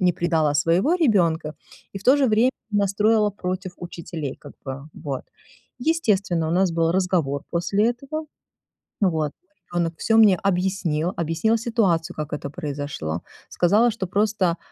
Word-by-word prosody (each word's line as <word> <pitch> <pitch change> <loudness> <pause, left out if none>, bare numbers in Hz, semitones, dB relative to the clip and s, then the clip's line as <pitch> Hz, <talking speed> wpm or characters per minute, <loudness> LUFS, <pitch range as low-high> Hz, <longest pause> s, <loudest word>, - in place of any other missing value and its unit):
не 180 -1 +3
предала 160 -4 +1
своего 170 - +3
ребёнка, 175 - +2 0.4
и 195 - -3
в - - -16
то 265 +3 +6
же 275 - +3
время 225 +4 +4 0.2
настроила 210 +1 +2
против 185 -1 -4
учителей 165 -5 -6
как 145 - -12
бы, 135 0 -6
вот. 140 -3 -5 0.5
Естественно, 200 - +1
у - - -1
нас 180 -1 +2
был 165 0 +2
разговор 175 -7 0
после 200 +6 +1
этого, 280 +6 -5 0.8
вот. 160 -7 +1 0.4
Ребёнок 170 -1 0
всё 225 - +2
мне 210 -4 +7
объяснил, 180 -3 0
объяснила 170 +7 +1
ситуацию, 190 -7 0
как 155 -1 -5
это 145 -1 -4
произошло, 145 - -4 0.3
сказала, 210 +7 +3
что 195 -4 -4
просто, 200 -3 +1
180 Hz, 145 wpm, -23 LUFS, 160-210 Hz, 0.8 s, мне